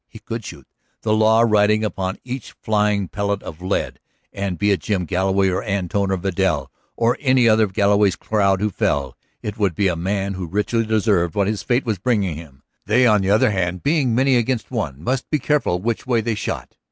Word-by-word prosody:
He - - -13
could 115 +1 -6
shoot, - - -10 0.4
the 110 - +1
law 110 +1 +4
riding 105 -1 +3
upon 95 -2 -3
each 125 -1 -7
flying 105 -2 0
pellet 100 +2 -2
of 80 +2 -9
lead, 95 +2 -2 0.3
and 100 -3 -3
be 105 0 +2
it 100 - +1
Jim 95 +2 -1
Galloway 95 +2 +1
or 90 - -1
Antone 100 -1 -1
or 95 - 0
Vidal, 95 -3 -1 0.2
or 115 +1 +1
any 130 -4 +3
other 110 0 +5
of 95 - -9
Galloway's 100 0 +3
crowd 100 -3 +1
who 105 0 0
fell, 70 -7 -1 0.3
it 105 +1 -5
would 100 -5 +1
be 100 - +2
a 90 - 0
man 95 +3 -2
who 95 -2 -5
richly 105 +5 -1
deserved 100 -6 +1
what 100 - +2
his 105 +1 -2
fate 125 +1 0
was 110 -6 -2
bringing 100 -6 0
him. 75 -4 -12 0.2
They, 125 +4 +4
on 105 -4 +4
the 95 - -1
other 110 +3 +4
hand, 90 -2 -2
being 140 -5 +1
many 130 +1 +3
against 120 -2 -1
one, 80 - -4
must 130 +6 -2
be 155 - +2
careful 145 -10 0
which 115 +6 -3
way 120 -3 +2
they 115 +1 -1
shot. 105 - -5
105 Hz, 210 wpm, -21 LUFS, 95-115 Hz, 0.4 s, other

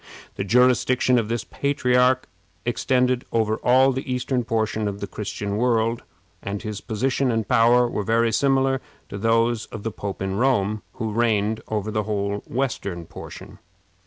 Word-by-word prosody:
The - - -2
jurisdiction 125 +3 +3
of 110 - -2
this 115 0 -1
patriarch 130 -2 +1 0.4
extended 125 -1 +1
over 110 -1 +1
all 130 +3 +4
the 130 0 -4
eastern 125 0 -1
portion 110 -1 -1
of 100 0 -4
the 100 - -3
Christian 100 0 -4
world, 115 -1 +1 0.4
and 100 +1 -4
his 105 -1 -5
position 125 +3 0
and 115 -4 0
power 120 +2 +4
were 110 - -2
very 115 +2 +2
similar 135 +1 +2 0.3
to 100 - -6
those 115 +1 +1
of 105 - -8
the 115 - -2
Pope 100 -1 -5
of 95 - -2
Rome, 105 -2 +1
who 110 -1 -3
reigned 110 -1 +1
over 110 0 -2
the 110 - 0
whole 100 -1 -2
western 100 -9 -3
portion. - - -11
115 Hz, 160 wpm, -23 LUFS, 105-125 Hz, 0.4 s, all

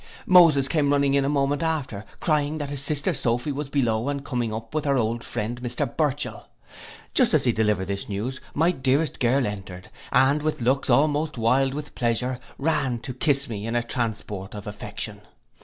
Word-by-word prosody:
Moses 165 -7 +6
came 145 -1 +1
running 140 -1 +3
in 140 -1 +3
a - - +1
moment 145 0 +1
after, 135 -11 -2
crying 150 -2 +1
out - - -4
that 145 -2 -4
his 140 -2 -4
sister 150 +4 0
Sophy 120 +1 0
was 140 0 -4
below 120 -3 +1
and 140 -1 -3
coming 120 -4 -2
up 110 +3 -6
with 155 -1 -1
our 140 -1 +3
old 115 0 -1
friend 120 +3 -4
Mr 120 0 -1
Burchell. 145 -2 -1 0.6
Just 250 - +4
as 145 - +3
he 120 - +3
delivered 105 -4 +1
this 100 +2 -4
news 110 +6 -3
my 165 +4 +3
dearest 140 +1 0
girl 130 +1 +2
entered, 95 -3 -7 0.2
and 140 +3 +4
with 155 0 -1
looks 130 +3 +1
almost 150 0 +2
wild 130 +4 +2
with 150 0 -6
pleasure, 125 +1 -1 0.2
ran 140 -4 0
to 130 - -6
kiss 140 +1 +1
me 105 -1 -5
in 115 - -2
a 120 - +1
transport 110 -5 -3
of 105 - -7
affection. 105 0 -6
135 Hz, 190 wpm, -25 LUFS, 115-145 Hz, 0.6 s, Moses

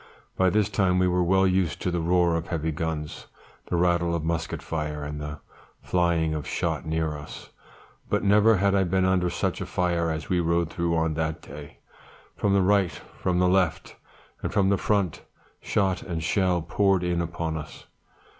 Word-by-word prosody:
By 95 0 +3
this 105 +2 +2
time 95 -3 +1
we 90 0 +3
were 90 0 +1
well 95 +2 +3
used 95 -4 +1
to 90 - 0
the 85 - -1
roar 85 0 +2
of 85 0 -3
heavy 80 -2 -2
guns, 80 -1 -4 0.4
the - - -1
rattle 85 0 +2
of 80 - -2
musket 80 0 -2
fire, 75 -2 -3
and 75 0 -5
the 75 -1 -6 0.4
flying 85 -3 +1
of 75 -2 -4
shot - - -2
near 80 -1 -1
us; 75 0 -10 0.6
but - - 0
never 105 +2 +5
had 100 +1 +2
I 100 -1 +3
been 95 +1 +1
under 90 -1 +2
such - - -2
a - - -2
fire 85 -2 0
as 80 +2 -4
we 90 -4 +1
rode 85 -1 +1
through 85 -1 -1
on 80 -1 +1
that 80 0 -3
day. 70 +1 -11 0.6
From 100 -1 +1
the 95 - +3
right, 100 -2 +2 0.2
from 90 -1 0
the 90 0 +3
left, 90 -3 +1 0.5
and - - -3
from 95 -1 +2
the 100 - +3
front, 100 -6 0 0.4
shot 95 -2 0
and 85 -4 -4
shell 90 -1 +1
poured 95 +2 +2
in 90 -1 0
upon 85 -1 -3
us. 80 -1 -8
85 Hz, 190 wpm, -26 LUFS, 80-95 Hz, 0.6 s, never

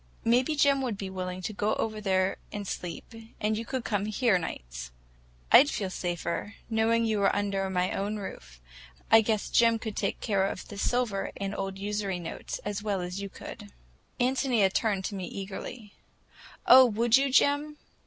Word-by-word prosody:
Maybe 250 +6 +3
Jim 280 -1 +3
would 240 -6 -2
be 195 -1 -5
willing 185 0 -5
to 215 - -3
go 210 +2 0
over 215 -1 -3
there 190 -1 +1
and 205 -2 -5
sleep, 175 +6 -6 0.3
and 215 +1 0
you 225 - -3
could 260 -2 -3
come 205 -1 -1
here 215 -3 +2
nights. - - -6 0.6
I'd 285 +3 +8
feel 195 -9 -3
safer, 175 +3 -3 0.2
knowing 225 +1 +2
you 220 -2 0
were 195 - +3
under 200 -1 -1
my 180 -1 0
own 205 +2 -2
roof. - - -9 0.5
I 225 - +9
guess 215 -1 -1
Jim 230 -1 +4
could 220 -2 -6
take 200 - -1
care 200 -4 +1
of 185 - -6
their 205 - -7
silver 230 -4 0
and 195 0 -3
old 195 0 -4
usury 200 -1 -2
notes 170 -2 -6
as 205 0 -3
well 205 -2 -1
as 180 +2 -4
you 200 - -5
could." 205 +1 -10 0.5
Ántonia 245 -6 +2
turned 200 -4 0
to - - -3
me 190 -3 -4
eagerly. 200 +3 -7 0.7
"Oh, 260 +1 +10
would 235 0 +3
you, 275 +1 +1
Jim? 290 +2 +2
205 Hz, 180 wpm, -28 LUFS, 190-230 Hz, 0.7 s, Oh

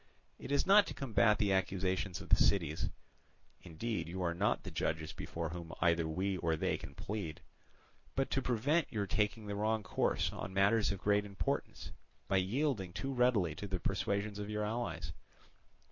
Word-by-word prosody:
It - - -7
is 140 - +2
not 200 +2 +7
to 140 - -5
combat 110 -5 +3
the 100 -3 +2
accusations 95 -1 0
of - - -10
the - - +8
cities 85 -5 +2 0.7
(indeed 90 +1 -3
you 90 +2 -4
are 85 -1 +1
not 85 - +1
the - - -6
judges 80 0 -2
before 85 -1 -4
whom 85 0 -7
either 85 -1 +3
we 95 +4 -1
or 80 -1 +1
they 75 - 0
can - - -10
plead), 100 -7 -4 0.8
but 135 - 0
to 135 - +1
prevent 135 +7 +1
your 105 -3 -1
taking 105 +3 0
the 100 - -4
wrong 110 +1 0
course 90 - 0
on 95 - -6
matters 100 +3 +4
of 100 - -3
great 100 +2 +2
importance 100 -1 -3 0.4
by 95 - +2
yielding 100 - 0
too 135 +6 -3
readily 120 -10 +3
to 100 +6 -6
the 95 -1 -2
persuasions 100 +3 -1
of 105 0 -4
your 105 0 -1
allies. 90 -8 -3
100 Hz, 175 wpm, -34 LUFS, 85-110 Hz, 0.8 s, the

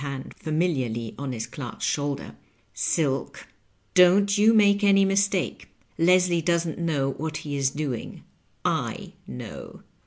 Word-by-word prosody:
hand 140 -2 -6
familiarly 135 -9 -1
on 140 -1 -4
his 115 -3 -4
clerk's 125 0 -6
shoulder, 145 -1 -1
^^ - - -11 0.4
Silk, 140 -4 -1 0.5
don't 195 +3 +5
you 210 +2 +5
make 205 -2 +4
any 195 -1 +5
mistake; 195 -1 0 0.3
Leslie 180 0 +3
doesn't 170 -1 0
know 145 -5 0
what 155 +3 -4
he 145 -1 -3
is 135 -1 +1
do 145 -1 -3
ing 115 - -8 0.2
— - - -42
/know. - - -5
160 Hz, 135 wpm, -25 LUFS, 135-185 Hz, 0.5 s, don't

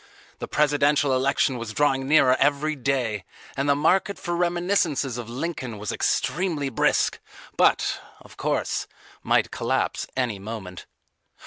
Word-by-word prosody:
The - - -5
presidential 145 -1 +2
election 130 -1 +1
was 115 -2 -6
drawing 135 -2 +1
nearer 135 -4 +5
every 145 +2 +1
day 125 -6 -1 0.3
and 140 +1 -1
the 140 - +5
market 190 +7 +2
for 175 -1 -3
reminiscences 175 -7 0
of 115 -1 -7
Lincoln 130 -3 -4
was 105 0 -4
extremely 165 -7 0
brisk, 120 - +1 0.4
but, - - +2 0.2
of - - -16
course, - - -1 0.3
might - - +2
collapse - - -1
any 120 -6 -1
moment. 95 -3 -8
140 Hz, 130 wpm, -24 LUFS, 120-155 Hz, 0.4 s, nearer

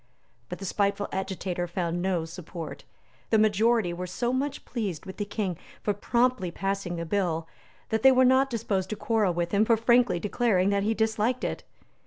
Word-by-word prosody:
But 180 - -5
the 195 - -7
spiteful 200 +1 0
agitator 190 -2 -3
found 175 -1 -2
no 180 -3 0
support. 165 0 -8 0.4
The 220 - +4
majority 215 -2 +3
were 180 +1 -5
so 240 +7 -1
much 275 +2 -2
pleased 205 - -4
with 190 - -8
the 205 - -2
King 200 -4 -3 0.2
for 205 - +1
promptly 235 -1 +1
passing 195 0 -3
the 170 0 -4
bill 165 -3 -1 0.4
that 220 0 0
they 265 - +8
were 260 0 +5
not 260 +1 +4
disposed 205 -6 -1
to 215 - -2
quarrel 210 -4 +1
with 170 0 -1
him 205 +1 +4
for 225 0 +3
frankly 235 -3 +3
declaring 200 -2 +1
that 200 0 +1
he 220 +3 0
disliked 220 +3 0
it. - - -3
200 Hz, 185 wpm, -27 LUFS, 180-225 Hz, 0.4 s, they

